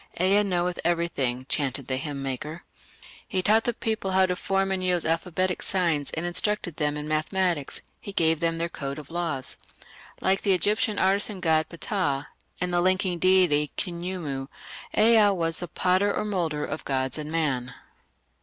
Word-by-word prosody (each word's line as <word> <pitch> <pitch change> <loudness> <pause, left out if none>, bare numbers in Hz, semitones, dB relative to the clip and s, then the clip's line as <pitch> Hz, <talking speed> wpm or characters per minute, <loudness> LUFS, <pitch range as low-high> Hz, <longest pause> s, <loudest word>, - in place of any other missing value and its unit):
"Ea 195 +3 +4
knoweth 180 -3 0
everything", 140 -8 0
chanted 135 -2 -1
the 130 0 -1
hymn 140 0 -4
maker. 145 +5 -5 0.6
He 185 -4 -1
taught 220 +3 +4
the 240 - +1
people 220 -5 -2
how 190 0 +5
to 180 -1 -1
form 195 +1 0
and 190 -1 -1
use 180 -2 +1
alphabetic 180 +3 0
signs 170 -6 0
and 160 - -2
instructed 175 -1 -1
them 150 -1 0
in 150 0 -5
mathematics: 155 0 0 0.2
he 200 - -7
gave 165 -4 +2
them 165 0 0
their 165 +1 -1
code 140 -4 -5
of 150 0 -10
laws. 165 -7 -3 0.6
Like 190 +1 +1
the 200 - +3
Egyptian 210 +2 +1
artisan 195 +1 +1
god 160 -3 +2
Ptah, 170 -6 -1 0.4
and 180 0 -1
the 175 - +3
linking 185 -1 +2
deity 180 -6 +4
Khnumu, 170 -7 -3 0.5
Ea 220 -1 +6
was 165 -1 0
the 175 - -5
"potter 185 +4 +2
or 210 - -1
moulder 170 -7 -1
of 155 - -5
gods 130 +1 -1
and 150 0 -4
man". 140 -7 0
175 Hz, 165 wpm, -26 LUFS, 150-190 Hz, 0.6 s, Ea